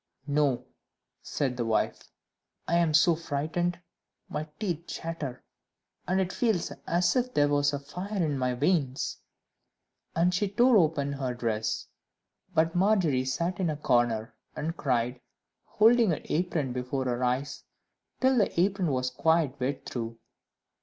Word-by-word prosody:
"No," 145 Hz, -3 st, +1 dB, 0.6 s
said 130 Hz, -3 st, -2 dB
the 120 Hz, -, -1 dB
wife; 110 Hz, -1 st, -1 dB, 0.6 s
"I 170 Hz, -, +1 dB
am 170 Hz, -2 st, +2 dB
so 160 Hz, +3 st, +5 dB
frightened, 165 Hz, +3 st, -2 dB, 0.5 s
my 155 Hz, -, -4 dB
teeth 175 Hz, -6 st, -3 dB
chatter, 165 Hz, -6 st, -5 dB, 0.6 s
and 185 Hz, +2 st, +2 dB
it 185 Hz, -1 st, -1 dB
feels 220 Hz, -8 st, 0 dB, 0.2 s
as 180 Hz, +1 st, +2 dB
if 250 Hz, 0 st, 0 dB
there 145 Hz, -, +4 dB
was 145 Hz, 0 st, +2 dB
a 145 Hz, -, -2 dB
fire 180 Hz, +9 st, -6 dB
in 150 Hz, -2 st, -1 dB
my 125 Hz, -1 st, 0 dB
veins;" 140 Hz, -2 st, 0 dB, 1.0 s
and 175 Hz, +2 st, +3 dB
she 195 Hz, +2 st, +1 dB
tore 240 Hz, +5 st, +4 dB
open 150 Hz, -5 st, +2 dB
her 130 Hz, -3 st, -3 dB
dress. 110 Hz, -2 st, -2 dB, 0.7 s
But 165 Hz, +1 st, +3 dB
Margery 180 Hz, -9 st, +2 dB
sat 170 Hz, +7 st, -1 dB
in 180 Hz, -3 st, +1 dB
a 150 Hz, -, -2 dB
corner, 120 Hz, -5 st, +1 dB, 0.2 s
and 165 Hz, +2 st, -3 dB
cried, 125 Hz, -3 st, -1 dB, 0.4 s
holding 230 Hz, 0 st, +4 dB
her 160 Hz, -, 0 dB
apron 160 Hz, -6 st, -1 dB
before 125 Hz, +1 st, -2 dB
her 125 Hz, 0 st, -1 dB
eyes, 130 Hz, +4 st, -1 dB, 0.6 s
till 260 Hz, -1 st, +4 dB
the 200 Hz, -, +1 dB
apron 190 Hz, 0 st, +2 dB
was 130 Hz, -3 st, 0 dB
quite 150 Hz, 0 st, +1 dB
wet 135 Hz, +2 st, -2 dB
through. 115 Hz, -2 st, -5 dB
150 Hz, 145 wpm, -28 LUFS, 130-180 Hz, 1.0 s, so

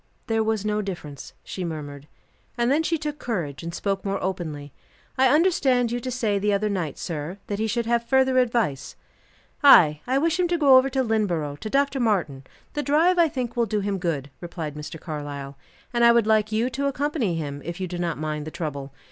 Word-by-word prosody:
"There 225 Hz, -2 st, +1 dB
was 220 Hz, -2 st, -1 dB
no 210 Hz, 0 st, 0 dB
difference," 170 Hz, -8 st, -7 dB
she 185 Hz, -, -6 dB
murmured, 145 Hz, -4 st, -6 dB, 0.5 s
and 240 Hz, +1 st, +2 dB
then 295 Hz, +3 st, +3 dB
she 330 Hz, +1 st, 0 dB
took 300 Hz, -1 st, -5 dB
courage 170 Hz, -, -3 dB
and 170 Hz, 0 st, -5 dB
spoke 195 Hz, +2 st, -2 dB
more 195 Hz, 0 st, -1 dB
openly. 155 Hz, -7 st, -4 dB, 0.4 s
"I 265 Hz, +1 st, +4 dB
understood 270 Hz, -6 st, +3 dB
you 240 Hz, -, -1 dB
to 255 Hz, -, -5 dB
say 225 Hz, -5 st, 0 dB
the 205 Hz, +1 st, +1 dB
other 210 Hz, +1 st, +1 dB
night, 180 Hz, -7 st, -3 dB
sir, 165 Hz, +2 st, -5 dB
that 205 Hz, 0 st, -4 dB
he 220 Hz, -, 0 dB
should 235 Hz, +1 st, -1 dB
have 235 Hz, 0 st, +1 dB
further 265 Hz, -1 st, +4 dB
advice." 225 Hz, -, 0 dB, 0.7 s
"Ay; 155 Hz, -, +7 dB
I 260 Hz, +2 st, +2 dB
wish 325 Hz, +4 st, +1 dB
him 360 Hz, -, +3 dB
to 345 Hz, 0 st, 0 dB
go 280 Hz, -4 st, +6 dB
over 260 Hz, +1 st, +5 dB
to 265 Hz, 0 st, 0 dB
Lynneborough, 175 Hz, -, -1 dB
to 215 Hz, -, -5 dB
Dr. 275 Hz, +2 st, +1 dB
Martin; 180 Hz, -, 0 dB, 0.3 s
the 295 Hz, -, -1 dB
drive, 325 Hz, +5 st, +3 dB
I 335 Hz, -, +6 dB
think, 255 Hz, -4 st, -4 dB
will 235 Hz, -1 st, +1 dB
do 210 Hz, 0 st, -1 dB
him 200 Hz, -1 st, -2 dB
good," 150 Hz, -6 st, -2 dB
replied 165 Hz, -4 st, -6 dB
Mr. 150 Hz, +2 st, -8 dB
Carlyle. 145 Hz, -3 st, -6 dB, 0.4 s
"And 235 Hz, 0 st, +2 dB
I 235 Hz, -, +8 dB
would 235 Hz, -2 st, +3 dB
like 215 Hz, -1 st, +2 dB
you 230 Hz, +4 st, 0 dB
to 280 Hz, +2 st, -1 dB
accompany 280 Hz, -, -1 dB
him, 145 Hz, -3 st, -4 dB
if 170 Hz, +3 st, -6 dB
you 185 Hz, -, -2 dB
do 175 Hz, 0 st, -5 dB
not 170 Hz, -2 st, -2 dB
mind 155 Hz, 0 st, -4 dB
the -, -, -3 dB
trouble. 145 Hz, -4 st, -5 dB
210 Hz, 215 wpm, -24 LUFS, 160-255 Hz, 0.7 s, I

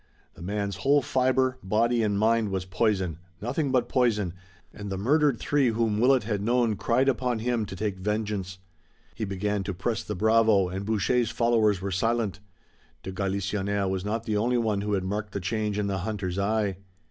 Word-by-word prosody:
The -, -, -15 dB
man's 100 Hz, +1 st, -3 dB
whole 140 Hz, +8 st, +3 dB
fiber, 130 Hz, +1 st, +1 dB
body 115 Hz, +5 st, +1 dB
and 105 Hz, -2 st, +1 dB
mind, 110 Hz, 0 st, +2 dB
was 95 Hz, -2 st, -2 dB
poison, 95 Hz, -3 st, 0 dB, 0.2 s
nothing 135 Hz, -, -1 dB
but 130 Hz, -2 st, +2 dB
poison, 105 Hz, -8 st, +1 dB, 0.4 s
and 100 Hz, 0 st, -7 dB
the 95 Hz, -, -2 dB
murdered 140 Hz, +5 st, +2 dB
three 145 Hz, +1 st, +1 dB
whom 110 Hz, -2 st, +1 dB
Willet 130 Hz, +1 st, +4 dB
had 105 Hz, -2 st, -2 dB
known 120 Hz, 0 st, +2 dB
cried 125 Hz, +6 st, +1 dB
upon 125 Hz, -2 st, +1 dB
him 115 Hz, -1 st, -1 dB
to 95 Hz, -, -7 dB
take 100 Hz, -1 st, -3 dB
vengeance. 105 Hz, -2 st, -2 dB, 0.6 s
He 110 Hz, -, -3 dB
began 100 Hz, +1 st, -2 dB
to 95 Hz, -1 st, -4 dB
press 110 Hz, +6 st, -2 dB
the 105 Hz, -, -5 dB
bravo 110 Hz, -2 st, +3 dB
and 95 Hz, +2 st, -5 dB
Boucher's 110 Hz, +2 st, +1 dB
followers 115 Hz, -4 st, +2 dB
were 100 Hz, -, -2 dB
silent. 105 Hz, 0 st, 0 dB, 0.6 s
De 95 Hz, -, -5 dB
Galisonnière 100 Hz, +1 st, -1 dB
was 95 Hz, -1 st, -2 dB
not 110 Hz, +2 st, -2 dB
the 110 Hz, -2 st, -1 dB
only 120 Hz, +4 st, +1 dB
one 110 Hz, -4 st, 0 dB
who 105 Hz, 0 st, -2 dB
had 95 Hz, -2 st, 0 dB
marked 105 Hz, +2 st, -3 dB
the 100 Hz, -, -2 dB
change 105 Hz, +2 st, -2 dB
in 105 Hz, -, 0 dB
the 100 Hz, -1 st, -1 dB
hunter's 95 Hz, -2 st, -3 dB
eye. 100 Hz, -2 st, 0 dB
105 Hz, 185 wpm, -27 LUFS, 100-115 Hz, 0.6 s, Willet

